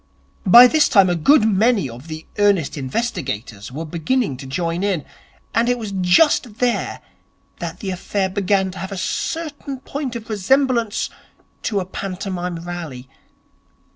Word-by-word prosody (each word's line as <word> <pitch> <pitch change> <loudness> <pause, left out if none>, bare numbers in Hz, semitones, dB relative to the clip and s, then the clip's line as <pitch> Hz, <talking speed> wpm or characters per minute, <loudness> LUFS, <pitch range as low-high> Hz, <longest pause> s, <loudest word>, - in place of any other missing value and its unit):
By 240 +7 +10
this 305 +4 +4
time 195 -7 +5
a - - +1
good 240 - +4
many 215 - +2
of 125 +5 -11
the 155 0 -7
Earnest 200 -7 +2
Investigators 130 - -4
were 155 +5 -5
beginning 170 - -1
to 135 0 -9
join 170 +4 -2
in; 190 -7 -1 0.5
and 235 +1 +2
it 245 - +2
was 220 -4 -5
just 200 - +3
there 245 -1 -1 0.6
that - - -6
the 195 -3 -3
affair 190 +1 -1
began 190 0 0
to 185 - -9
have 190 +1 -5
certain 290 - -3
points 275 -2 -5
of 225 -2 -6
resemblance 235 +1 +1 0.5
to 205 -3 -1
a 185 - -3
pantomime 180 -2 -5
rally. 155 -8 -7
195 Hz, 145 wpm, -20 LUFS, 170-235 Hz, 0.6 s, By